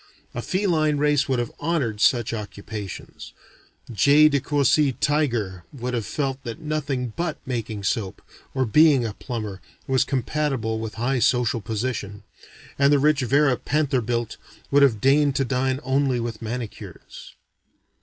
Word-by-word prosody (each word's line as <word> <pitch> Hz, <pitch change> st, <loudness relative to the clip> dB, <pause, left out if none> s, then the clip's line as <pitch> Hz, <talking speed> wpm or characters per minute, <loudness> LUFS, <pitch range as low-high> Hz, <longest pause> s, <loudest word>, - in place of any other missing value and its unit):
A -, -, -4 dB
feline 165 Hz, -6 st, +1 dB
race 145 Hz, -1 st, +2 dB
would 130 Hz, -, +1 dB
have 120 Hz, -1 st, -2 dB
honored 140 Hz, -10 st, -1 dB
such 120 Hz, -3 st, +3 dB
occupations. 105 Hz, -2 st, -7 dB, 0.6 s
J. 145 Hz, +9 st, +6 dB
de 140 Hz, -1 st, +1 dB
Courcy 145 Hz, 0 st, +2 dB
Tiger 120 Hz, -, -1 dB
would 125 Hz, -2 st, -5 dB
have 115 Hz, -3 st, -2 dB
felt 135 Hz, -2 st, -3 dB
that 115 Hz, -3 st, -6 dB
nothing 145 Hz, -6 st, -3 dB
but 170 Hz, -3 st, -2 dB
making 115 Hz, -5 st, -4 dB
soap, 95 Hz, -1 st, -2 dB, 0.3 s
or 130 Hz, -1 st, +1 dB
being 145 Hz, +1 st, +5 dB
a 110 Hz, -, -3 dB
plumber, 110 Hz, -6 st, -6 dB, 0.2 s
was 135 Hz, 0 st, +2 dB
compatible 135 Hz, -4 st, -1 dB
with 110 Hz, -1 st, -6 dB
a 115 Hz, -, -7 dB
high 130 Hz, +2 st, +1 dB
social 120 Hz, -2 st, +2 dB
position; 105 Hz, -2 st, -4 dB, 0.6 s
and 140 Hz, 0 st, +5 dB
the 145 Hz, -, +5 dB
rich 150 Hz, 0 st, +3 dB
Vera 135 Hz, +2 st, +3 dB
Pantherbilt 125 Hz, -6 st, -1 dB, 0.3 s
would 140 Hz, +1 st, +5 dB
have 120 Hz, -7 st, +4 dB
deigned 140 Hz, +1 st, +3 dB
to 135 Hz, -, +1 dB
dine 130 Hz, +1 st, 0 dB
only 135 Hz, -1 st, +1 dB
with 115 Hz, -2 st, -5 dB
manicures. 115 Hz, 0 st, -8 dB
130 Hz, 145 wpm, -23 LUFS, 115-145 Hz, 0.6 s, J